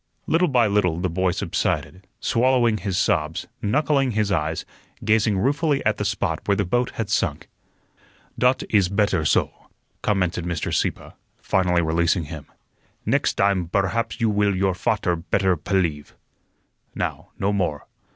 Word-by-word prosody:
Little 175 +3 +2
by 125 -5 +3
little 100 -5 +1
the 90 -1 -1
boy 95 +2 +1
subsided, 95 +2 -2
swallowing 120 -2 +2
his 95 -2 -3
sobs, 80 -3 0 0.2
knuckling 135 +2 +1
his 105 -1 0
eyes, 80 -3 -1 0.4
gazing 110 -2 +3
ruefully 140 - +1
at - - +2
the - - -2
spot - - -1
where 100 - +3
the 100 - +1
boat 120 +7 0
had 110 - -2
sunk. - - -1 0.9
"Dot 125 +1 +3
is 100 -5 +3
better 100 -4 +1
soh," - - +2 0.5
commented 90 -4 0
Mr. 85 -1 -3
Sieppe, - - -1 0.3
finally 90 -2 +1
releasing 85 +2 +1
him. 75 -1 -8 0.6
"Next - - +1
dime 100 -2 +2
berhaps 100 +5 -1
you 115 -2 +2
will 100 -1 +2
your 95 0 +1
fat'er 90 0 0
better 95 +2 +1
pelief. 80 -3 -2 0.8
Now, - - -3
no 100 +1 0
more. 90 -7 -1
95 Hz, 145 wpm, -23 LUFS, 90-110 Hz, 0.9 s, by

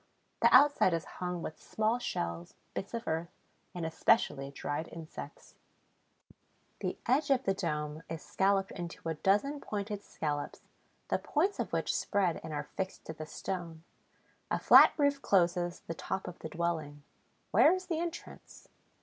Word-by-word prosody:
The - - +6
outside 280 -11 +6
is 165 - -3 0.2
hung 180 -1 -2
with 155 - -6
small 220 +3 0
shells, 85 - -4 0.2
bits 195 - -4
of 230 - -5
earth, 165 +1 -1 0.5
and, 175 -2 -3
especially, 150 -4 +2
dried 145 +3 -4
insects. 165 - -9 1.3
The - - -3
edge 280 +5 +2
of 265 -1 +3
the 195 - +2
dome 150 -4 -3
is 165 -1 -5
scalloped 195 0 +1
into 175 -2 -7
a - - 0
dozen 205 - +1
pointed 205 -1 -4
scallops, 145 -2 -4 0.5
the - - +1
points 365 +7 0
of - - -2
which - - 0
spread 185 -5 0
and 160 - -6
are 145 -1 -2
fixed 190 0 -4
to 160 - -5
the 155 0 -8
stone. 170 -3 -5 0.7
A - - +1
flat - - +8
roof 285 -2 +2
closes 175 -3 +2
the 165 - -5
top 190 +3 -4
of 180 - -8
the 160 - -6
dwelling. 155 -3 -2 0.5
Where 310 - +7
is 370 +1 -1
the 335 -3 -2
entrance? 340 +1 -7
175 Hz, 160 wpm, -32 LUFS, 160-220 Hz, 1.3 s, flat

